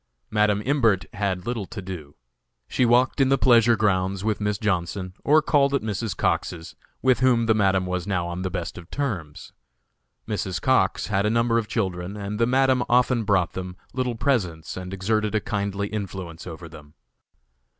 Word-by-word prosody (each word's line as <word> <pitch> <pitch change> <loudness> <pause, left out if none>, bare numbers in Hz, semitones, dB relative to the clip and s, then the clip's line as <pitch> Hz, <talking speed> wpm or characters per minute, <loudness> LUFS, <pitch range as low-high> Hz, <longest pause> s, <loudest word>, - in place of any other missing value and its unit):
Madam 105 -1 +2
Imbert 115 -9 +2
had 100 -3 -2
little 115 -5 -3
to 115 - -7
do. 90 -7 -8 0.5
She 125 - +1
walked 125 +4 +3
in 135 - +4
the 135 - +4
pleasure 120 -2 +5
grounds 95 -2 0
with 110 -1 -1
Miss 105 -1 0
Johnson, 95 -2 -2
or 155 +1 +4
called 140 -3 +3
at 140 - -1
Mrs. 110 -1 -3
Cox's, 80 -1 -2 0.3
with 130 -2 +4
whom 125 -3 +3
the 110 - +4
Madam 95 -3 +2
was 90 0 -3
now 90 -4 0
on 85 +1 -4
the 95 - -2
best 85 0 -5
of 85 +1 -14
terms. 100 - -4 0.7
Mrs. 90 -3 -2
Cox 100 -4 +2
had 100 0 +1
a - - +2
number 115 +1 +2
of 110 - -4
children 95 -3 -3
and 105 +1 -5
the 115 - +3
Madam 130 0 +3
often 125 -1 +3
bought 95 -4 +2
them 90 -1 -6 0.2
little 125 -2 -1
presents 95 - -1
and 90 0 -6
exerted 105 +3 0
a - - +3
kindly 100 -1 -2
influence 95 -5 -6
over 85 0 -8
them. 75 -1 -14
105 Hz, 180 wpm, -24 LUFS, 90-115 Hz, 0.7 s, pleasure